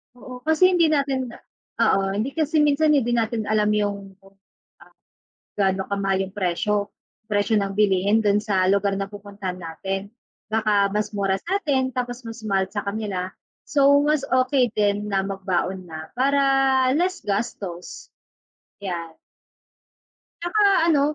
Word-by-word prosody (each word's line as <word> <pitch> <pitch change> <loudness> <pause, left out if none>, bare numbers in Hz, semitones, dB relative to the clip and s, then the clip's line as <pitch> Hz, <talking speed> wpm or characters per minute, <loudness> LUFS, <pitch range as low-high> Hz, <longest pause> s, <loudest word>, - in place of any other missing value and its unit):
Oo, 250 0 -10
kasi 340 +4 +5
hindi 340 -2 +4
natin 275 -4 0 0.5
oo, 220 -4 +3
hindi 225 +7 -1
kasi 310 -1 +1
minsan 300 +1 +3
hindi 240 -4 +1
natin 230 -1 0
alam 210 0 +1
yung 200 -2 -2
kung, 195 0 -22 0.4
ah, - - -20 0.6
gaano 190 -1 0
kamahal 195 -1 0
yung 195 - -24
presyo, 200 +2 -1 0.3
presyo 210 +1 +1
ng 200 -1 -1
bilihin 200 +1 +2
dun 205 -1 +3
sa 195 -3 +1
lugar 200 0 +2
na 195 0 -3
pupuntahan 200 -2 -7
natin. 190 +4 -5 0.3
Baka 210 -2 +1
mas 210 0 -1
mura 195 -1 0
sa'tin, 295 -8 0
tapos 245 -1 -4
mas 225 -1 -9
mahal 195 -2 0
sa 205 0 -4
kanila. 200 -3 -3 0.3
So, 280 -2 +3 0.2
mas 300 -1 +2
okay 255 0 +2
din 205 0 +1
na 195 -1 0
magbaon 190 -1 -3
na, 155 0 -9
para 280 +3 +2 0.5
less 365 +6 -1
gastos. 205 - -4 0.7
Yan. 170 -4 -5 1.3
Tsaka 410 +5 +1 0.3
ano, 285 - +3
210 Hz, 140 wpm, -23 LUFS, 195-255 Hz, 1.3 s, kasi